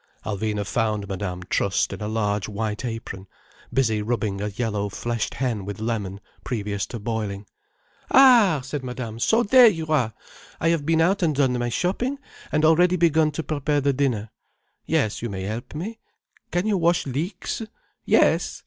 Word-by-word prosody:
Alvina 105 0 -2
found 105 -1 -1
Madame 90 -2 -4
trussed 95 +1 0
in - - -8
a 105 - -2
large 105 -2 -1
white 105 +1 -3
apron, 115 -5 -6 0.4
busy 110 -5 +1
rubbing 105 -3 -2
a 105 - -1
yellow 105 -1 -2
fleshed 115 +2 -3
hen 120 -6 -1
with 100 +1 -6
lemon, 105 -4 -3 0.2
previous 105 -4 -3
to 120 - -6
boiling. 105 -2 -3 0.6
"Ah!" 235 - +6
said 135 +1 -5
Madame. 125 -3 -5
"So 225 - +3
there 245 +3 +7
you 165 -7 +1
are! 125 -8 +1 0.4
I 165 - +2
have 160 -3 0
been 165 0 +3
out 195 +4 +2
and 160 -4 +2
done 135 -2 +2
my 120 0 -1
shopping, 200 - -1 0.3
and 155 0 +2
already 175 +3 +5
begun 160 -3 +3
to 160 - -3
prepare 150 -1 0
the 140 0 +1
dinner. 125 -6 -1 0.6
Yes, 110 -1 0
you 120 - -3
may 95 -2 -5
help 110 +8 -5
me. 215 +9 -5 0.5
Can 175 +2 0
you 210 -3 +1
wash 170 +1 +2
leeks? 165 - -3 0.4
Yes? - - +2
120 Hz, 165 wpm, -24 LUFS, 105-160 Hz, 0.6 s, there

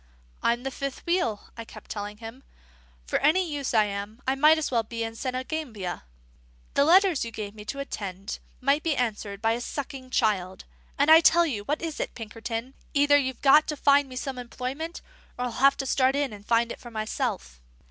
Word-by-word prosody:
"I'm 235 +1 +1
the 270 - -3
fifth 275 0 -5
wheel," 340 - -1
I 230 - -6
kept - - -12
telling 205 0 -5
him. 225 +4 -9 0.6
"For - - 0
any 345 +6 +3
use 290 -4 -3
I 220 -2 +5
am, 205 +2 -5
I 265 - +3
might 305 +4 +5
as 315 - -2
well 235 -2 +3
be 230 +1 -5
in 225 0 -4
Senegambia. 255 - -4 0.7
The 280 - +4
letters 365 -1 +5
you 230 - -4
give 210 -3 -6
me 210 -1 -11
to 275 - -5
attend 200 -8 -6
to - - -4 0.2
might 275 +3 +3
be 315 -4 0
answered 215 -3 -2
by 225 - +3
a 235 +1 -1
sucking 265 0 -6
child. 190 -6 0 0.3
And 285 +3 +4
I 325 +1 +10
tell 340 +1 +5
you 230 -10 -3
what 300 +6 -2
it - - 0
is, 320 -2 -4
Pinkerton: 225 +2 -5 0.2
either 290 0 +5
you've 260 -3 -3
got 295 +2 +6
to 300 - -3
find 280 0 +4
me 255 - -9
some 255 0 -4
employment, 260 +7 -5 0.4
or 250 - -1
I'll 245 - -3
have 275 +4 +4
to 270 - -3
start 265 0 +2
in 280 -5 0
and 205 0 -12
find 235 0 +2
it - - -7
for 240 - -10
myself." 65 - -3
255 Hz, 210 wpm, -26 LUFS, 220-285 Hz, 0.7 s, I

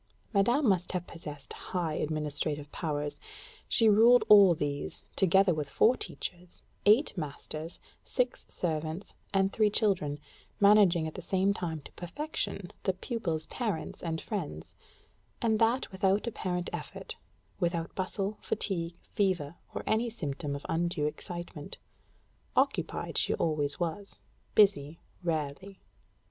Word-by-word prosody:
Madame 240 +8 +3
must 185 -3 +2
have 180 -1 -2
possessed 150 -5 -9
high 170 -4 -3
administrative 150 -1 -2
powers: 150 -3 -3 0.5
she 225 - +5
ruled 230 +4 +7
all 200 -4 +9
these, 145 -2 -3
together 190 0 +4
with 150 -2 -3
four 240 +3 +4
teachers, 175 -6 -6 0.2
eight 220 +6 +5
masters, 155 0 -6 0.2
six 250 -1 -1
servants, 160 +2 -3 0.2
and 195 0 +2
three 215 -1 +4
children, 185 -9 +1 0.4
managing 200 -5 +6
at 160 - -4
the - - -7
same 195 +1 +2
time 165 -5 -3
to - - -12
perfection 200 - -4
the 190 - +1
pupil's 185 -6 -3
parents 220 -9 -3
and 165 -2 -2
friends; 155 - -5 0.7
and 220 -2 +2
that 230 +2 +2
without 195 +2 +2
apparent 180 -6 -2
effort, - - -6 0.4
without 170 -2 -1
bustle, 195 +2 -3
fatigue, 170 -4 -2
fever, 180 -7 0 0.2
or - - -3
any 225 +2 +1
symptom 145 -8 -4
of 140 - -8
undue 165 -2 0
excitement; 170 0 -6 0.8
occupied - - +1
she - - +2
always 150 -3 0
was 180 +4 -3 0.4
busy, 165 -7 +4 0.2
rarely. 165 +3 -3
180 Hz, 125 wpm, -30 LUFS, 155-205 Hz, 0.8 s, all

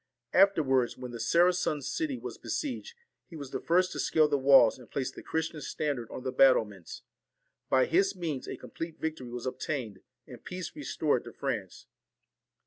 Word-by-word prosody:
After 195 -4 +5
wards, 130 -3 +1
when 125 -1 -7
the 120 - -7
Saracen 170 +5 +3
city 295 - -2
was - - -8
besieged, 295 - -4 0.3
he 170 - -12
was 140 -4 -8
the - - -2
first 180 +2 +2
to - - -5
scale 155 -1 +3
the 145 - +1
walls 135 -4 +6
and 125 - -15
place 130 -2 -2
the - - -10
Christian 160 -1 -3
standard 135 -4 -3
on 130 - -7
the 130 - -2
battlements. 110 -9 +2 0.7
By 130 -1 +4
his 195 +4 +2
means 160 -7 -4
a - - -5
complete 165 -1 -7
victory 155 -6 -4
was 120 0 -6
obtained, 125 -5 -4 0.3
and - - -12
peace 180 - -6
restored 295 - 0
to - - -8
France. - - -4
150 Hz, 175 wpm, -30 LUFS, 130-175 Hz, 0.7 s, walls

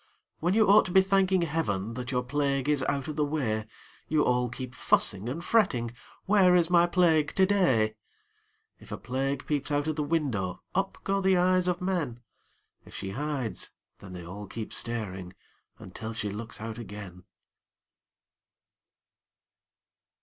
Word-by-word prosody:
When 175 +4 +1
you 220 -1 +5
ought 200 +2 +7
to 185 - -4
be 190 +1 +6
thanking 190 -2 +2
Heaven 115 - -1
That 125 +1 -5
your 125 -1 0
plague 140 +1 0
is 150 -2 +2
out 140 -2 -2
of 155 - -4
the 150 - +2
way, 120 -8 -1 0.4
You 155 -1 +2
all 125 0 +1
keep 125 +1 -7
fussing 110 -3 +1
and 160 +7 -4
fretting 125 - +2 0.3
"Where 190 -3 +5
is 175 -1 +3
my 175 0 +5
Plague 165 -4 +2
to 190 - +5
day?" 135 - +2 0.9
If - - -15
a - - -3
Plague 135 +3 -2
peeps 145 -2 -1
out 145 0 0
of 155 - -1
the - - 0
window, 130 - -1
Up 195 +1 -1
go 195 0 0
the 190 -1 +3
eyes 180 0 +3
of 180 0 0
men; 170 -11 -1 0.6
If - - -14
she 95 -1 -5
hides, 135 -1 -3 0.3
then 95 - -11
they 90 -1 -8
all 100 +4 -8
keep 110 +2 -6
staring 95 -6 -5 0.4
Until 110 +5 -7
she 105 -2 -3
looks 110 +3 -7
out 110 +1 -6
again. 100 -5 -9
140 Hz, 160 wpm, -28 LUFS, 110-175 Hz, 0.9 s, ought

